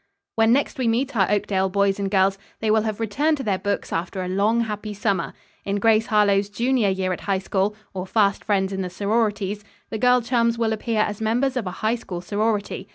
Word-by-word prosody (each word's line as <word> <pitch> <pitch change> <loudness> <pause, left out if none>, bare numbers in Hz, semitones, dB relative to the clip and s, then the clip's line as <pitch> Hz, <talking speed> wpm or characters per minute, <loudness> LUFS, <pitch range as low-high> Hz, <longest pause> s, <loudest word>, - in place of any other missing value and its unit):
When 225 0 +3
next 280 +2 +1
we 250 - +1
meet 250 +4 0
our 195 -4 +3
Oakdale 195 -2 +1
boys 200 +1 +1
and 200 -1 -1
girls, 195 0 +2 0.2
they 220 -1 +1
will 220 0 +4
have 215 -1 -3
returned 285 +8 +1
to 270 - -5
their 200 -5 0
books 200 +1 -2
after 185 +3 -3
a - - -4
long 205 +5 +2
happy 210 -1 -4
summer. 200 -1 -1 0.3
In 200 - -2
"GRACE 220 +1 +3
HARLOWE'S 205 -2 +3
JUNIOR 235 0 +1
YEAR 190 -1 -1
AT - - -6
HIGH 195 - +3
SCHOOL"; 195 +2 -1 0.2
Or, 185 -1 -5
"FAST 200 0 +2
FRIENDS 195 -2 0
IN 190 - -2
THE 180 - -3
SORORITIES," 205 0 -1 0.3
the 220 - -3
girl 250 +1 +4
chums 235 -1 +1
will 225 -1 +1
appear 220 0 -1
as 210 0 -2
members 245 +5 +1
of 235 -7 -2
a 180 - -7
High 220 - +3
School 180 -6 -7
sorority. 210 +2 -2
210 Hz, 220 wpm, -23 LUFS, 195-225 Hz, 0.3 s, will